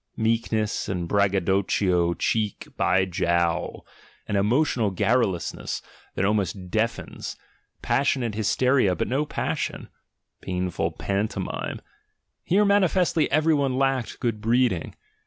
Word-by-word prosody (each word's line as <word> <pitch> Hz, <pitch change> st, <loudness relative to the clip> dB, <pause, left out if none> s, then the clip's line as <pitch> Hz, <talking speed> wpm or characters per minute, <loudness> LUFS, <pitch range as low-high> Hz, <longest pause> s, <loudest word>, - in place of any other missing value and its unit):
Meekness 110 Hz, -1 st, 0 dB
and 90 Hz, -3 st, -2 dB
braggadocio 95 Hz, -2 st, +2 dB
cheek 105 Hz, +4 st, -1 dB
by 95 Hz, +2 st, +2 dB
jowl; 85 Hz, -1 st, 0 dB, 0.4 s
an 105 Hz, -, -1 dB
emotional 115 Hz, +2 st, +2 dB
garrulousness 100 Hz, -1 st, 0 dB, 0.3 s
that 95 Hz, -, +1 dB
almost 100 Hz, -3 st, -1 dB
deafens; 115 Hz, +2 st, -2 dB, 0.5 s
passionate 130 Hz, -5 st, +1 dB
hysteria, 110 Hz, 0 st, +2 dB
but -, -, -2 dB
no 140 Hz, +4 st, 0 dB
passion; -, -, -3 dB, 0.5 s
painful 90 Hz, -1 st, -2 dB
pantomime; 100 Hz, -1 st, -3 dB, 0.6 s
here 205 Hz, +4 st, +3 dB
manifestly 185 Hz, -5 st, +3 dB
every 155 Hz, +2 st, +3 dB
one 135 Hz, -3 st, +1 dB
lacked 135 Hz, -3 st, 0 dB
good 115 Hz, -3 st, -2 dB
breeding. 115 Hz, -6 st, +1 dB
105 Hz, 100 wpm, -25 LUFS, 95-130 Hz, 0.6 s, here